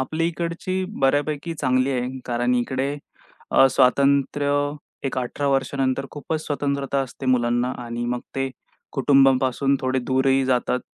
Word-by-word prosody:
आपली 155 +5 -1
इकडची 175 +2 -3 0.2
बऱ्यापैकी 145 +4 +1
चांगली 130 -2 +1
आहे. 130 0 -2
कारण 120 0 0
इकडे 130 +3 -1 0.5
अ, 135 - +6
स्वातंत्र्य 140 +2 +3 0.6
एक 130 - -3
18 130 +3 -3
वर्षानंतर 135 0 0
खूपच 155 +2 -4
स्वतंत्रता 140 -1 -1
असते 130 +1 -8
मुलांना 120 0 +2
आणि 120 0 -4
मग 125 0 -2
ते 135 0 -1 0.4
कुटुंबांपासून 135 0 +3
थोडे 130 0 0
दूरही 130 +1 +2
जातात. 125 0 +1
135 Hz, 125 wpm, -23 LUFS, 130-140 Hz, 0.6 s, अ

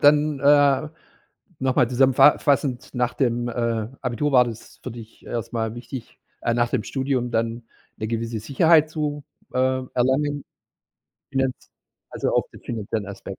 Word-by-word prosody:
dann, 150 0 +4
äh, 145 0 +4 0.7
noch 130 -1 0
mal 130 -5 +4
zusammenfa 130 +3 +5
fassend, 135 -3 0
nach 125 -1 0
dem, 120 -2 0
äh, 115 -2 -1
Abitur 130 +3 -1
war 125 -2 +7
das 115 -2 -9
für 130 - -5
dich 115 -1 -12
erst 115 -2 -4
mal 110 -1 -2
wichtig 120 +1 -8 0.2
äh, 120 - +1
nach 120 0 +1
dem 130 - 0
Studium 130 -1 -1
dann 115 +1 -1 0.3
'ne 110 - -4
gewisse 115 0 -2
Sicherheit 155 +7 +4
zu, 150 -2 -3 0.3
äh, - - -1 0.4
erlangen, 140 +3 +1 0.9
finaz 135 -1 +1 0.6
also, - - -1
auch - - +3
den - - -13
finanziellen 110 -2 -3
Aspekt, 95 -1 -8
125 Hz, 150 wpm, -23 LUFS, 115-140 Hz, 0.9 s, war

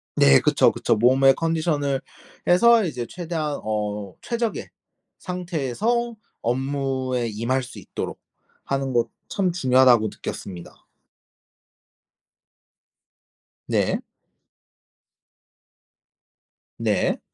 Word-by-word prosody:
네. 70 -1 +6
그쵸, - - +4
그쵸. - - +1
몸의 130 +4 +5
컨디션을 155 -4 0 0.5
해서 230 +6 +6
이제 125 -8 -3
최대한 160 -4 -3
어 105 -2 -3
'최적의 235 -2 -3 0.5
상태에서 180 - -2 0.3
업무에 130 -1 -1
임할 120 +5 -1
수 125 -4 -10
있도록 95 - -6 0.5
하는 135 -1 -2
것 120 -1 +2 0.2
참 185 -3 +1
중요하다.'고 130 -7 +4
느꼈습니다. 90 -3 -8 2.8
네. - - +1 2.8
네. - - 0
135 Hz, 175 characters per minute, -23 LUFS, 120-170 Hz, 2.8 s, 네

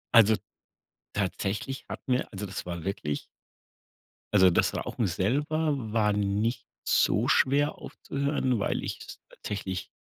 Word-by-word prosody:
Also, 110 -1 +8 0.8
tatsächlich 100 +6 -2
hat - - -7
mir 125 0 +1
also 100 +1 -4
das 95 - -5
war 85 -2 -5
wirklich 75 -7 -2 1.1
also 95 -2 +7
das 85 - +2
Rauchen 115 - -1
selber 145 - +1 0.2
war 105 -2 +3
nicht 105 +4 0 0.2
so - - +3
schwer 145 +2 +3
aufzuhören, 140 -3 -1
weil - - -1
ich - - -3
es - - -10
tatsächlich 95 -3 -5
105 Hz, 125 wpm, -28 LUFS, 95-130 Hz, 1.1 s, Also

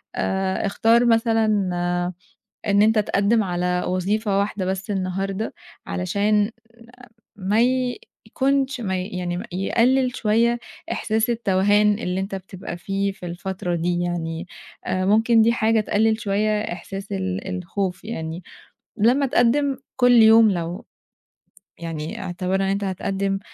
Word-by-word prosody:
آآ، 190 +1 -1
اختار 230 +4 +3
مثلًا 225 -1 +3 1.2
إن 200 0 +4
أنت 220 0 +4
تقدّم 210 +2 +2
على 180 0 -1
وظيفة 195 +3 0
واحدة 200 -1 -2
بس 190 +2 -3
النهارده 195 +2 -2 0.3
علشان 205 +4 +1 0.8
ما 200 +2 0 0.7
يكونش 270 -1 0
ما 190 -3 -1
ي 185 - -5
يعني 180 -3 -4
يقلّل 245 +7 +1
شوية 235 +2 +2 0.3
إحساس 220 +1 0
التوهان 205 -1 +3
اللي 180 -3 -2
أنت 195 0 -4
بتبقى 185 -2 -7
فيه 195 +1 -2
في 185 - -11
الفترة 175 0 -4
دي، 175 +1 0
يعني 175 0 -3 0.4
آآ، 185 0 -1
ممكن 225 +3 +4
دي 230 - +4
حاجة 225 -1 +2
تقلّل 220 +2 +1
شوية 210 0 0
إحساس 195 +2 -6
ال 190 -1 -3
الخوف، 185 +1 -3
يعني 165 -5 -5 0.6
لمّا 250 +6 +3
تقدّم 265 +3 +2 0.2
كل 245 -1 +5
يوم 225 -1 +7
لو 175 +4 -4 1.0
يعني 160 -2 -5
اعتبرنا 190 +2 -1
أنت 200 +1 -1
هتقدّم 195 +1 -2
200 Hz, 120 wpm, -22 LUFS, 185-225 Hz, 1.2 s, يوم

